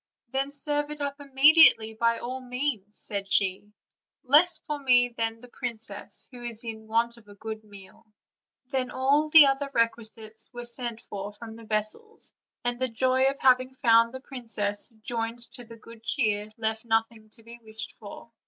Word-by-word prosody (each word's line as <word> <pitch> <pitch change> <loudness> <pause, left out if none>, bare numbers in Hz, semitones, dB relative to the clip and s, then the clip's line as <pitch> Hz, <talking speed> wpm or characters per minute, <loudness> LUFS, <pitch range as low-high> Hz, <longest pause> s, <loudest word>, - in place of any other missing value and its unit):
"Then 270 +2 -1
serve 290 +1 0
it 300 0 -7
up 280 0 -3
immediately, 275 -5 +6
by 230 +1 +1
all 255 +3 -5
means," 250 -5 -3
said 200 -1 -4
she, 195 +1 0 0.5
"less 315 +6 +5
for 300 -1 -5
me 250 -2 +4
than 225 -1 -3
the 250 - -12
princess, 225 -5 -5
who 245 -1 -11
is 235 -1 -3
in 220 -1 -7
want 230 +1 0
of 220 -3 -19
a 205 - -14
good 220 +1 -7
meal." 200 -1 -15 0.6
Then 255 -1 -2
all 280 +4 +2
the 310 -1 +9
other 275 +1 0
requisites 225 -2 -1
were 240 -1 -7
sent 235 -1 -3
from 205 +3 -8
the 225 0 -12
vessels; 215 - -3 0.3
and 245 0 -1
the 260 - +1
joy 260 +3 +2
at 275 +1 0
having 255 0 +4
found 230 -2 +4
the 260 +1 -8
princess, 225 -7 -2
joined 230 0 -2 0.2
to 245 -3 -9
the 230 0 -12
good 230 0 -15
cheer, 215 -4 0
left 220 0 -2
nothing 225 -1 -1
to 225 - -17
be 235 +1 -12
wished 220 0 -5
for. 215 +2 -11
235 Hz, 170 wpm, -27 LUFS, 220-260 Hz, 0.6 s, the